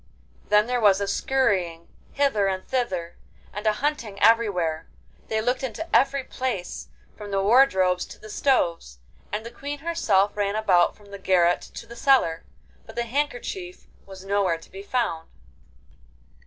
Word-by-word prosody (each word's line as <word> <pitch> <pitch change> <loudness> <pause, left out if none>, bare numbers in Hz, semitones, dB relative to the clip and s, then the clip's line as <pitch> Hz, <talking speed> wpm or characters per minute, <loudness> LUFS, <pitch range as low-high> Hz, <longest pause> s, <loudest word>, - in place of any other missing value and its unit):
Then 210 0 +5
there 245 0 -1
was 200 -2 +5
a 200 - -2
scurrying 195 -9 0 0.3
hither 270 -8 +2
and 190 -1 -3
thither, 185 -10 -2 0.4
and 210 +2 -4
a 215 - +4
hunting 230 -10 -2
everywhere: 195 -8 +2 0.4
they 220 0 -1
looked 250 +3 0
into 265 +6 -4
every 275 +1 +3
place, 255 -9 -4 0.3
from 210 -1 -9
the 195 -1 0
wardrobes 190 -6 +4
to - - -12
the 215 - -13
stoves, 170 - 0 0.3
and 215 +2 -3
the 235 - -7
Queen 285 +4 -6
herself 220 - +1
ran 205 0 -1
about 185 -5 +3
from 205 -1 -19
the 200 - -8
garret 175 -2 +3
to - - -7
the 235 +1 -11
cellar, 235 -11 +3 0.4
but 225 - -12
the 240 - 0
handkerchief 290 - -4 0.2
was 190 -1 -11
nowhere 195 -4 +1
to 165 - -17
be 195 - -8
found. 200 -7 -2
210 Hz, 155 wpm, -25 LUFS, 190-250 Hz, 0.4 s, Then